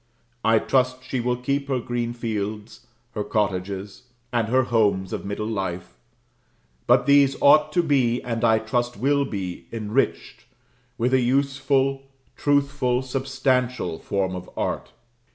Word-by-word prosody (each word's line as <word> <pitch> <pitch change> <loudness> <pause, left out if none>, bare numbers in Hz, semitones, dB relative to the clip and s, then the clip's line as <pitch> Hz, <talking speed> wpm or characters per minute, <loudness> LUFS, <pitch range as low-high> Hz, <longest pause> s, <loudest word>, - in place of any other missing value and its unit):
I 115 0 +4
trust 130 +2 +1
she 130 0 -3
will 125 +1 0
keep 140 +3 -2
her 135 -2 0
green 120 0 -3
fields, 110 -1 -5 0.2
her 105 -3 -3
cottages, 100 -1 -2 0.3
and 115 -2 +1
her 130 +3 +3
homes 105 -6 +1
of - - -4
middle 100 +1 -3
life; 95 -5 -4 0.9
but - - +4
these 140 -1 +5
ought 150 +2 +5
to 175 - +3
be, 130 -6 +2
and 115 -1 -3
I 110 -1 +5
trust 120 +2 -2
will 140 +5 +2
be 95 -7 -5
enriched 115 +3 -2 0.5
with 125 +3 0
a 130 - +4
useful, 135 +1 +1 0.3
truthful, 140 -3 +1
substantial 130 - -1
form 95 -2 -2
of 90 0 -8
art. - - -2
120 Hz, 135 wpm, -24 LUFS, 105-135 Hz, 0.9 s, these